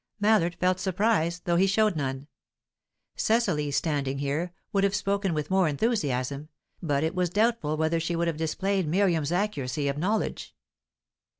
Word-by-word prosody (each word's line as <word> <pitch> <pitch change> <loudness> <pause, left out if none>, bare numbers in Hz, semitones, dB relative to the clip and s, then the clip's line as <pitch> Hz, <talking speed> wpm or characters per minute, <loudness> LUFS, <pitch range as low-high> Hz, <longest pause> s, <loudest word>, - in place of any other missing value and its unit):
Mallard 205 -5 +3
felt 185 0 +2
surprise, 185 -3 0
though 170 -1 +1
he 190 +2 +4
showed 210 0 +2
none. 135 -2 -3 0.9
Cecily, 190 -10 +1
standing 140 -2 -1
here, 145 +5 -2 0.2
would 195 -1 +2
have 200 0 +2
spoken 200 -1 0
with 150 +3 -3
more 190 -2 +3
enthusiasm, 145 - -1 0.3
but 145 -4 0
it 160 - 0
was 180 -1 0
doubtful 205 -6 +1
whether 160 +1 +1
she 165 +1 -2
would 170 +1 0
have 165 -2 -1
displayed 185 +4 -1
Miriam's 170 -3 +1
accuracy 150 -8 -1
of 140 +1 -2
knowledge. 210 +6 -2
170 Hz, 155 wpm, -27 LUFS, 150-195 Hz, 0.9 s, he